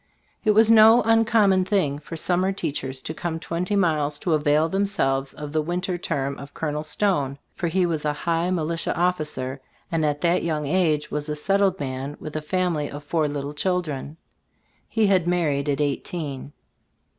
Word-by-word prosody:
It 215 - +1
was 220 +1 +6
no 225 +2 +7
uncommon 220 -4 +4
thing 180 -8 0
for 155 +2 -8
summer 185 +3 +1
teachers 135 -8 -4
to 160 - -4
come 165 0 -4
twenty 180 +5 -2
miles 155 -6 +1
to 170 - 0
avail 150 +1 +3
themselves 160 -8 0
of 150 -1 -8
the 155 0 +1
winter 180 +3 -2
term 140 -5 -2
of 140 +1 -11
"Col." 150 -1 -2
Stone, 155 -6 0 0.2
for 175 - -2
he 180 +2 +2
was 160 -3 -1
a 150 - +1
high 170 +1 +1
mili 165 -2 -1
tia - - 0
officer, 150 -7 -1 0.3
and 165 -1 0
at 145 -1 0
that 175 +1 +2
young 155 -3 -1
age 155 -1 +1
was 150 +1 -2
a 150 - -1
settled 195 +5 +1
man 135 +1 -4
with 155 - -8
a 155 - -1
family 165 -2 -1
of 145 +1 -8
four 155 0 0
little 145 0 -4
children. 155 -3 -2 0.7
He 225 -1 +2
had 185 -4 +3
married 150 -5 +1
at 140 - 0
eighteen. 145 -1 -3
160 Hz, 180 wpm, -24 LUFS, 145-180 Hz, 0.7 s, no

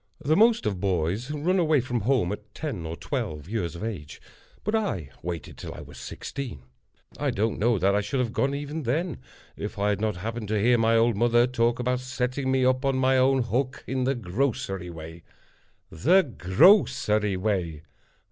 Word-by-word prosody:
The 155 +2 +1
most 225 - +4
of 100 -4 -1
boys 95 - -1
run 160 +6 +1
away 155 -4 +3
from 125 -1 -2
home 110 -4 +1
at 105 0 -8
ten 110 - -4
or 80 - -4
twelve 75 -2 -4
years 95 -6 -3
of 85 - -7
age, 90 -10 -6 0.4
but 210 - -1
I 100 - -1
waited 85 -3 -6
till - - -7
I - - -8
was - - -12
sixteen. 125 - -6 0.6
I - - 0
don't 110 +2 -1
know 115 +1 +3
that 95 +2 +2
I 105 - +2
should 105 +7 -2
have 120 -3 -1
gone 140 +1 +1
even 145 +2 -4
then, 155 +7 -1 0.4
if - - -6
I 100 +1 +1
had 100 -1 0
not 110 -3 0
happened 110 +3 -4
to 105 0 0
hear 120 +3 +4
my 115 0 +4
old 115 0 +3
mother 120 +2 +4
talk 120 -1 +1
about 125 0 0
setting 130 +1 -2
me 130 -1 +2
up 130 +1 +2
on 135 -1 +1
my 130 0 +3
own 130 0 +3
hook 125 +3 -2
in 130 0 -1
the 135 +1 +1
grocery 95 -4 -2
way. 80 0 -9 0.7
The 175 - +4
grocery 105 - +3
way! 90 -6 -2
115 Hz, 190 wpm, -26 LUFS, 100-130 Hz, 0.7 s, most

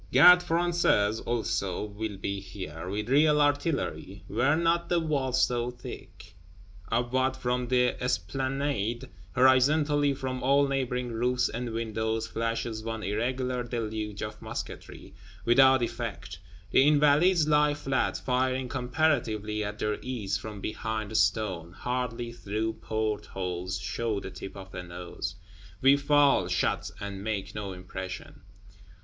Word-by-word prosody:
Gardes 180 0 +8
Françaises, 165 -12 +2
also, 105 -6 -1
will 105 0 -5
be 100 +1 -3
here, 90 -4 -7
with 105 +2 -3
real 150 +3 +4
artillery: 145 - 0
were 120 +8 +2
not 170 +1 +1
the 175 - +3
walls 135 -5 +1
so 120 0 -1
thick! 120 -6 -10 0.6
Upward 130 +3 +1
from 125 -1 -1
the 125 0 +1
Esplanade, 130 -2 -1 0.3
horizontally 140 +3 +4
from 130 -1 -4
all 140 +2 +4
neighboring 125 -2 -1
roofs 125 +2 +1
and 120 +1 -4
windows, 110 0 -2
flashes 115 -1 -3
one 110 -1 -4
irregular 125 +5 -1
deluge 110 -3 -4
of - - -6
musketry, - - -7 0.3
without 130 +1 +6
effect. 115 -7 -5 0.3
The 135 - +5
Invalides 150 +3 +4
lie 150 -1 +4
flat, 135 -2 0
firing 130 0 0
comparatively 120 -6 0
at 105 0 -4
their 105 0 -1
ease 110 -7 -3
from 100 +1 -6
behind 110 0 -3
stone; 95 -7 +1
hardly 125 +1 -3
through 110 -1 -3
port 110 -1 -2
holes 90 0 -3
show 110 +3 -2
the - - -7
tip 95 - -8
of 95 0 -10
a 90 - -4
nose. 85 -1 -6 0.4
We 135 +1 +6
fall, 140 -7 +4
shot; 90 - 0
and 100 -1 -6
make 100 -2 -3
no 100 -2 -4
impression! 95 +1 -7
120 Hz, 130 wpm, -28 LUFS, 105-135 Hz, 0.6 s, Gardes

